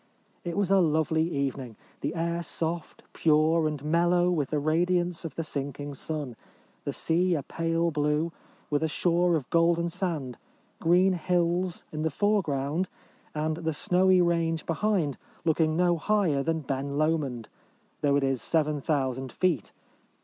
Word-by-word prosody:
It 175 +1 -4
was 200 -2 +1
a 195 - +6
lovely 160 -1 +2
evening: 135 -6 -3 0.2
the - - -3
air 170 +1 -1
soft, 170 0 -4
pure, 155 +1 +3
and 150 -2 -4
mel 170 +3 +2
low 175 0 +3
with 150 -6 0
the 155 - 0
radiance 175 +3 +1
of 160 -5 -6
the 165 - -2
sinking 145 -1 -5
sun; 145 -3 -4 0.5
the - - -1
sea 175 +2 +1
a 145 - -2
pale 165 +2 -1
blue, 150 +2 0 0.4
with 145 0 +1
a 160 - +2
shore 175 +2 +2
of 140 -6 -2
golden 170 0 +3
sand; 165 - -3 0.4
green 180 +3 +4
hills 175 0 0
in 155 - -4
the 160 - +1
foreground, 165 -3 0 0.5
and 155 +1 -1
the 160 -1 -2
snowy 180 +3 +3
range 165 -2 0
behind 165 -4 0 0.3
looking 160 0 +2
no 175 -1 +3
higher 175 -6 +1
than 160 +2 -1
Ben 140 0 -3
Lomond, 150 -7 0 0.5
though 140 -1 +3
it 140 - +2
is 135 -2 0
7000 140 -4 0
feet. 170 - 0
160 Hz, 150 wpm, -27 LUFS, 145-175 Hz, 0.5 s, a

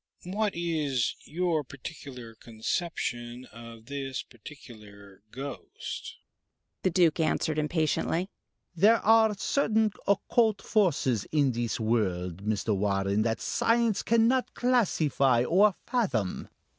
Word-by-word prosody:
What 205 +3 -1
is 155 -7 -1
your 170 -2 0
particular 130 -3 -9
conception 120 +1 -4
of 115 0 -12
this 135 -1 -4
particular 105 -6 -14
ghost?" 135 +4 -7 0.7
The 185 - +2
Duke 170 -2 +3
answered 155 -1 0
impatiently. 160 +3 0 0.4
"There 210 +7 +5
are 220 -1 +5
certain 220 -2 +1 0.2
occult 215 +2 +2
forces 140 - +1
in 145 -4 +3
this 120 0 -2
world, 95 -5 -1
Mr. 105 0 0
Warren, 100 +1 0
that 115 +1 -1
science 230 -3 +1
cannot 230 +3 +2
classify 155 - +2
or 190 +8 +4
fathom. 130 - -1
145 Hz, 105 wpm, -28 LUFS, 115-190 Hz, 0.7 s, There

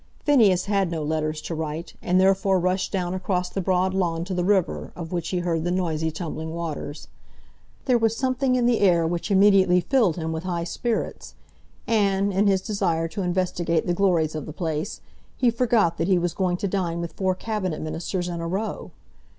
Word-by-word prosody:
Phineas 220 -11 +4
had 195 -3 +1
no 165 -2 -3
letters 155 0 -2
to - - -4
write, 160 +1 -4
and 180 +1 +2
therefore 190 0 +3
rushed 185 +2 0
down 180 -2 -1
across 180 -1 -1
the 195 - -3
broad 185 +1 +1
lawn 170 -3 0
to 190 - -4
the 180 -1 0
river, 190 -2 0
of 165 -2 -7
which 170 -2 -2
he 185 - -1
heard 170 -2 -1
the 175 - -1
noisy 165 -3 0
tumbling 160 0 -5
waters. 155 -3 -5 0.8
There 250 -3 +3
was 225 0 +1
something 260 0 +1
in 245 -1 +2
the 240 -2 +3
air 175 -4 +4
which 170 +4 -2
immediately 195 -2 +5
filled 210 - +2
him 160 -1 -3
with 160 +1 -4
high 175 -2 -2
spirits; 225 +6 -3 0.5
and, 200 -3 +1
in 200 +2 +3
his 190 -1 +3
desire 180 -6 -1
to 200 - -4
investigate 175 -2 0
the 175 - +1
glories 175 -4 +2
of 155 -3 -5
the 155 - -7
place, 160 +3 -3 0.4
he 245 -2 +3
forgot 225 -8 +2
that 165 - 0
he 190 -2 +4
was 175 -1 -1
going 180 -2 0
to 200 - -2
dine 180 -3 -1
with 170 -1 -5
four 185 +1 0
Cabinet 190 -5 -3
Ministers 170 +3 -3
in 170 -1 -4
a 165 - -3
row. 195 +5 -3
180 Hz, 200 wpm, -24 LUFS, 165-195 Hz, 0.8 s, immediately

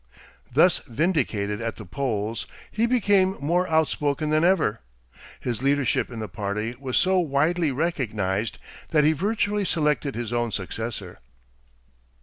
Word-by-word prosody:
Thus - - +5
vindicated 115 - 0
at 115 -1 -3
the 110 - -10
polls, 110 +1 -2 0.2
he 225 +2 +1
became 200 -6 +3
more 175 +5 +1
outspoken 155 -1 +1
than 155 +1 +3
ever. 170 - +3 0.6
His 120 -2 -3
leadership 140 -2 +1
in 120 - -8
the 110 -1 -4
party 105 +4 -3
was 130 -2 -1
so 185 0 +3
widely 160 +1 +1
recognized 110 - -1 0.3
that 150 -2 +3
he 155 +2 +5
virtually 205 +4 0
selected 150 - 0
his 120 0 -4
own 120 -1 0
successor. 100 0 -5
140 Hz, 135 wpm, -25 LUFS, 110-170 Hz, 0.6 s, Thus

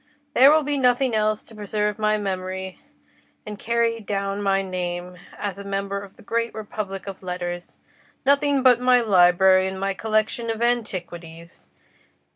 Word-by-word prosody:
"There 265 +3 +7
will 310 0 +4
be 290 0 -1
nothing 250 0 +2
else 215 0 0
to - - -17
preserve 210 0 -2
my 215 0 +2
memory 190 -2 -4 0.7
and 210 -1 -7
carry 230 0 0
down 200 -1 -3
my 195 -1 +1
name 180 -1 -5 0.2
as 200 -2 -4
a - - -7
member 200 0 -3
of 200 -1 -12
the - - -16
great 230 +2 -2
republic 205 -2 -6
of 195 -2 -8
letters—nothing 185 +10 -2
but 250 -2 +6
my 250 0 +4
library 185 -2 +5
and 190 0 -5
my 195 0 -1
collection 220 +3 -1
of 225 -1 -2
antiquities. 175 -8 -4
200 Hz, 150 wpm, -23 LUFS, 190-230 Hz, 0.7 s, There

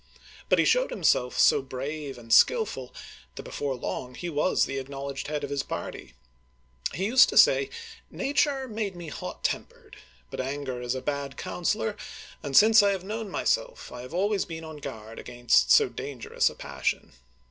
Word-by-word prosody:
But - - +4
he - - +3
showed - - +3
himself 125 - +1
so - - +5
brave 135 +2 -6
and 115 -1 -3
skillful 470 - +3 0.4
that - - -7
before 140 -2 -3
long 125 0 -5
he 175 - -5
was 150 +5 +2
the 135 0 -3
acknowledged 135 0 -6
head 150 -1 -3
of 140 - -4
his 140 -1 0
party. 65 - -7 0.8
He 190 - -1
used 255 +5 +6
to - - -2
say, 410 - +6 0.4
Na 280 - -3
ture 275 -2 +1
made 210 -4 -3
me 170 -2 -8
hot - - -7
tempered, - - -4 0.3
but - - -3
anger 135 -2 -4
is 125 +1 -2
a 130 - -4
bad 140 -1 -3
counselor, 210 +4 -2 0.5
and 140 -3 0
since 220 +1 +8
I 200 - +3
have 195 -2 -2
known 215 +2 -5
myself, - - -1
I 125 - -8
have 125 - -10
always 200 +2 +1
been 165 -1 -7
on 160 -1 -8
guard 115 -6 -8
against 120 0 +2
so 455 -4 +7
dangerous 140 - -2
a - - -11
passion." - - -3
150 Hz, 180 wpm, -27 LUFS, 135-215 Hz, 0.8 s, since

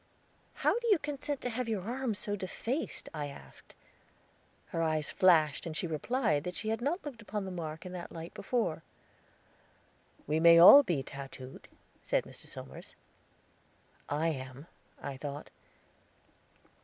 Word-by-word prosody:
"How - - +2
could 475 0 -1
you 405 - +6
consent 290 -2 -4
to 245 - -2
have 240 0 -3
your 210 -5 -1
arm 245 +1 -2
so 205 0 -2
defaced?" 225 - -4
I 150 -2 -3
asked. 140 - -13 0.9
Her 165 - -2
eyes 155 -2 0
flashed 160 -5 +4
as 155 -1 -4
she - - -1
replied 165 - 0
that 180 +1 -5
she 215 - -3
had 225 +1 -1
not 310 +8 -1
looked 260 -6 -7
upon 210 -2 -4
the 190 - -5
mark 160 -2 -6
in 180 - -6
that 180 -1 -7
light 165 0 -8
before. 200 -7 -1 1.4
"We 155 +2 +1
may 170 0 +8
all 185 +12 +11
be 175 - -1
tattooed," 135 -2 -9 0.3
said - - +1
Mr. - - -13
Somers. - - -10 1.1
"I 155 +3 +1
am," 130 -1 -6 0.3
I 135 -2 -6
thought. 145 +1 -6
175 Hz, 150 wpm, -32 LUFS, 155-235 Hz, 1.4 s, all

